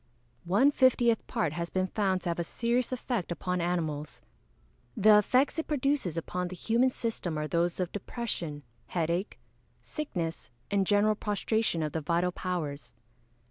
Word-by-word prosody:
_ - - -15
One 225 +11 +5
fiftieth 245 -4 +3
part 220 -11 -1
has 170 +1 -3
been 185 0 0
found 190 -1 0
to 175 - -1
have 170 - -2
a - - +1
serious 235 +7 0
effect 245 -7 -2
upon 180 +2 -1
animals. 160 -4 -2 0.7
The 210 +1 +7
effects 260 +9 +2
it 320 - -3
produces 275 - 0
upon 180 +2 -2
the 185 - -7
human 230 +7 +2
system 225 -10 -3
are 150 0 -2
those 170 +2 0
of 180 -2 -1
depression, 180 - -4 0.2
headache, 170 +3 -1 0.5
sickness, 175 - -4 0.2
and 195 -2 +2
general 205 +1 +4
prostration 210 -3 0
of 150 - -2
the 160 - -2
vital 170 +4 +1
powers. 150 -9 -4
185 Hz, 155 wpm, -29 LUFS, 170-230 Hz, 0.7 s, The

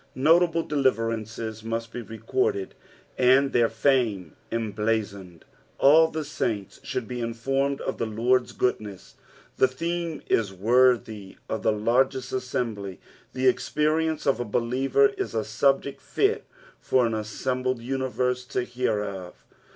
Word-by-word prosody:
Notable 165 +4 +4
deliver 130 -6 +1
ancea 110 0 -5
must 115 0 -4
bo - - -4
recorded, 385 - -2 0.5
and 130 +2 +4
their 120 -1 +4
fame 115 - +1 0.2
emblazoned. 105 -5 -2 0.3
All 160 +4 +6
the 160 -1 -4
saints 110 -9 -3
should 130 -4 -4
be 125 +1 -4
informed 135 +4 -1
of 135 - -4
the 115 - -1
Lord's 120 +3 +1
goodness. 105 -6 -3 0.4
The 130 - +5
theme 170 +4 -3
is 105 -4 +1
worthy 110 -1 +2
of 110 - -3
the - - +2
largest 125 +4 +1
assembly, 115 -7 -3 0.3
the 130 0 +1
experience 155 +4 +1
of 135 -3 +2
a - - 0
belierer 130 - +2
is 390 - -3
a - - +1
subject - - +1
fit 420 +2 0 0.3
for 130 -2 +2
an 115 - -1
assembled 125 +4 -2
universe 125 0 -1
to 125 0 -2
hear 120 -4 -1
of. 95 -3 -8
125 Hz, 135 wpm, -26 LUFS, 110-135 Hz, 0.5 s, All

